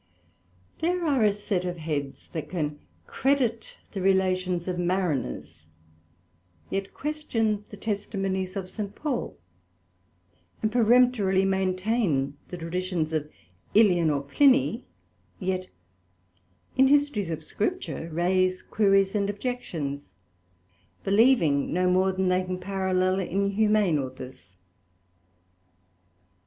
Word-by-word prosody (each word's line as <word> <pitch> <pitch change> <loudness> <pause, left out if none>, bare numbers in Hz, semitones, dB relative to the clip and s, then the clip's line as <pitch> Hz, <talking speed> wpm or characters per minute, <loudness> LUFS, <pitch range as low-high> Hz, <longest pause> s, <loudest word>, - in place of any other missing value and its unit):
There 350 +2 0
are 275 -7 +2
a 210 - +5
set 200 -2 -2
of 180 -1 -3
Heads, 150 -4 -4
that 160 - -4
can 150 -4 -3 0.3
credit 255 -5 0
the 195 - -4
relations 185 -2 +1
of 180 -1 -2
Mariners, 175 - -2 1.0
yet 195 0 -2
question 225 -9 -2
the 205 - -10
Testimonies 195 -3 -2
of 190 -2 -4
St. 205 +1 -6
Paul; 285 -6 -3 1.2
and 215 - 0
peremptorily 230 -5 +4
maintain 185 - 0
the 180 - -7
traditions 170 -1 -2
of 150 -1 -1 0.5
Ælian 180 -7 +5
or 140 -1 -1
Pliny, 260 - +3 0.5
yet 185 0 -2 1.1
in 265 +1 +5
Histories 285 - +2
of 160 -1 -4
Scripture 205 - -3
raise 185 +2 +1
Queries 195 -2 +3
and 200 -2 0
Objections, 185 - -4 0.9
believing 195 - +3
no 180 +1 +1
more 185 +1 +3
than 190 0 -1
they 180 0 +3
can 185 0 -4
parallel 185 0 0
in 195 +2 0
humane 210 -6 +3
Authors. 130 -9 -8
190 Hz, 110 wpm, -26 LUFS, 175-215 Hz, 1.2 s, a